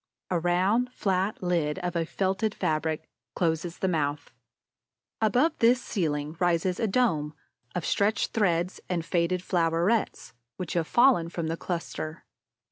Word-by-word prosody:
A 175 Hz, -, +2 dB
round, 190 Hz, +9 st, +2 dB
flat 190 Hz, +1 st, 0 dB
lid, 165 Hz, -4 st, 0 dB
of 180 Hz, -1 st, -3 dB
a 165 Hz, -1 st, +1 dB
felted 195 Hz, +4 st, -1 dB
fabric, 155 Hz, 0 st, -1 dB, 0.3 s
closes 165 Hz, 0 st, -1 dB
the 190 Hz, -, 0 dB
mouth. 145 Hz, -4 st, -1 dB, 0.9 s
Above 250 Hz, +9 st, +3 dB
this 240 Hz, +2 st, +5 dB
ceiling 155 Hz, -, -2 dB
rises 175 Hz, 0 st, +1 dB
a 225 Hz, -, +1 dB
dome 165 Hz, -10 st, +1 dB, 0.4 s
of 175 Hz, -, -2 dB
stretched 205 Hz, +1 st, +1 dB
threads 180 Hz, -4 st, +1 dB
and 170 Hz, -3 st, -1 dB
faded 175 Hz, +1 st, 0 dB
flowerets 170 Hz, -, 0 dB, 0.2 s
which 180 Hz, -, -4 dB
have 170 Hz, -2 st, 0 dB
fallen 240 Hz, -10 st, +4 dB
from 170 Hz, -2 st, -3 dB
the 165 Hz, -, -1 dB
cluster. 165 Hz, -2 st, -5 dB
175 Hz, 135 wpm, -27 LUFS, 165-195 Hz, 0.9 s, this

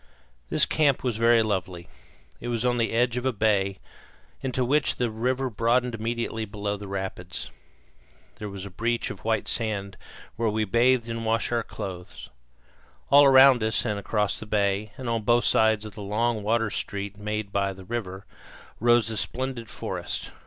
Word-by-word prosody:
This -, -, +4 dB
camp 145 Hz, -4 st, +2 dB
was 120 Hz, -4 st, -1 dB
very 115 Hz, 0 st, +4 dB
lovely. 95 Hz, -4 st, -3 dB, 0.5 s
It 120 Hz, -, -7 dB
was 120 Hz, 0 st, -1 dB
on 120 Hz, -1 st, +2 dB
the 115 Hz, -1 st, 0 dB
edge 120 Hz, +1 st, +1 dB
of 125 Hz, -, -3 dB
a -, -, +2 dB
bay, 100 Hz, -3 st, +1 dB, 0.6 s
into 130 Hz, -1 st, -1 dB
which 145 Hz, +4 st, +2 dB
the 120 Hz, -2 st, -1 dB
river 125 Hz, +4 st, -1 dB
broadened 120 Hz, +2 st, +1 dB
immediately 115 Hz, 0 st, -3 dB
below 105 Hz, -1 st, -3 dB
the 100 Hz, 0 st, -8 dB
rapids. 95 Hz, -2 st, -5 dB, 0.9 s
There 105 Hz, -, -6 dB
was 100 Hz, -1 st, -7 dB
a 100 Hz, -, -9 dB
beach 115 Hz, +5 st, -1 dB
of -, -, -10 dB
white 110 Hz, -1 st, 0 dB
sand, 100 Hz, -4 st, -1 dB, 0.4 s
where 115 Hz, -1 st, +1 dB
we 110 Hz, +1 st, 0 dB
bathed 120 Hz, +3 st, +3 dB
and 115 Hz, 0 st, -4 dB
washed 115 Hz, +1 st, 0 dB
our 120 Hz, -1 st, +1 dB
clothes. 90 Hz, -4 st, -8 dB, 0.8 s
All 140 Hz, +1 st, +8 dB
around 135 Hz, -2 st, +7 dB
us, 110 Hz, 0 st, +1 dB
and 105 Hz, -1 st, -1 dB
across 105 Hz, 0 st, 0 dB
the 110 Hz, -, -8 dB
bay, 100 Hz, 0 st, 0 dB
and 130 Hz, -, -6 dB
on 115 Hz, -1 st, 0 dB
both 120 Hz, +2 st, +3 dB
sides 110 Hz, -1 st, +3 dB
of 105 Hz, -, -8 dB
the 105 Hz, -, -9 dB
long 110 Hz, +3 st, 0 dB
water 110 Hz, +1 st, +1 dB
street 100 Hz, 0 st, -4 dB
made 105 Hz, -1 st, -3 dB
by 100 Hz, 0 st, 0 dB
the 95 Hz, 0 st, -11 dB
river, 100 Hz, -4 st, -5 dB, 0.5 s
rose 120 Hz, 0 st, +4 dB
the 110 Hz, -1 st, -3 dB
splendid 125 Hz, +2 st, -3 dB
forest. -, -, -3 dB
110 Hz, 175 wpm, -26 LUFS, 100-120 Hz, 0.9 s, All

